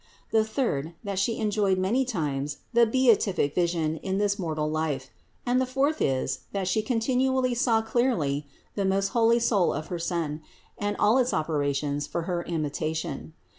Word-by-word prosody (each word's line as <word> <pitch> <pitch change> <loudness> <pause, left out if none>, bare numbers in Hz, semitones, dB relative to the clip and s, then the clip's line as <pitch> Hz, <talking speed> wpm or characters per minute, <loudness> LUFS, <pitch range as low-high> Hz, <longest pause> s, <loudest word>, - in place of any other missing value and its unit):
The 220 -1 +4
third, 215 - -2
that 200 -2 -2
She 225 +3 0
enjoyed 210 -3 +1
many 220 +8 +1
times 145 - -2 0.2
the 235 0 +5
beatific 220 - +3
vision 170 -3 0
in 190 +3 -2
this 205 0 +1
mortal 155 -4 -1
life, 155 -4 -2 0.3
and 250 +1 +2
the 260 - 0
fourth 275 +4 0
is 130 -1 0
that 195 -2 -1
She 215 +4 +2
continually 255 +2 +1
saw 235 -2 +2
clearly 170 - 0 0.3
the 200 - -1
most 195 +1 +1
holy 230 -1 +4
soul 210 -6 +2
of 155 - -5
her 175 - -3
Son 165 -3 -2 0.3
and 205 0 -2
all 220 +5 +4
its 250 0 +1
operations 145 -2 -1
for 170 - -3
her 175 0 -2
imitation. 160 0 -3
190 Hz, 165 wpm, -27 LUFS, 155-230 Hz, 0.3 s, the